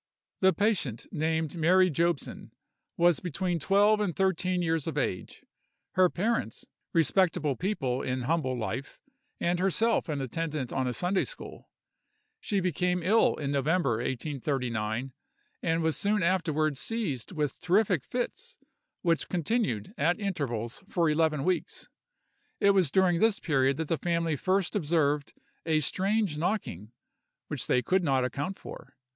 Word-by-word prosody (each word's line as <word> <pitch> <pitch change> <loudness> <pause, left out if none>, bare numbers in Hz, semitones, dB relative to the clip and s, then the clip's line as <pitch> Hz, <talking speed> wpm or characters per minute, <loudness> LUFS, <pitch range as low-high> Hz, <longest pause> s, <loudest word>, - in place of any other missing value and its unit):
The 190 0 +5
patient, 185 - 0
named 160 -1 -1
Mary 180 +3 +4
Jobson, 170 +1 -1 0.5
was 175 -1 +4
between 175 0 -2
twelve 205 +6 +4
and 200 -5 -1
thirteen 185 -1 +1
years 165 -2 0
of 160 - -3
age; 110 -9 -3 0.5
her 185 -1 +4
parents, 225 +7 -2 0.3
respectable 165 -3 +2
people 135 -9 -1
in 130 0 -2
humble 130 -3 0
life, 120 +4 -4 0.4
and 175 +1 0
herself 195 +3 +1
an 150 -2 -1
attendant 150 0 -3
on 130 -1 0
a 125 - -1
Sunday 180 +2 +1
school. - - -8 0.7
She 205 - -1
became 180 0 0
ill 215 +6 +4
in 140 -2 -3
November, 140 -2 +1
1839, 125 -2 -2 0.5
and 165 0 0
was 160 -1 +1
soon 205 -1 +1
afterward 155 -5 +1
seized 185 - -3
with 150 -4 -2
terrific 185 - +2
fits, 475 - -5 0.5
which 170 -2 +1
continued, 180 - -1
at 170 +7 +2
intervals, 140 - -3
for 170 -3 +2
eleven 155 -2 +1
weeks. 175 -2 -2 0.7
It 200 -2 +5
was 190 -6 +3
during 180 +1 +3
this 220 0 +3
period 135 -3 +1
that 160 -1 -2
the 165 -2 -1
family 170 -1 0
first 185 +6 0
observed 150 -5 0 0.3
a 155 -1 +3
strange 190 +1 0
knocking, 155 - -2 0.6
which - - -4
they 125 - +2
could 185 +7 +2
not 135 -4 +2
account 145 +9 -3
for. - - -11
165 Hz, 140 wpm, -28 LUFS, 140-185 Hz, 0.7 s, The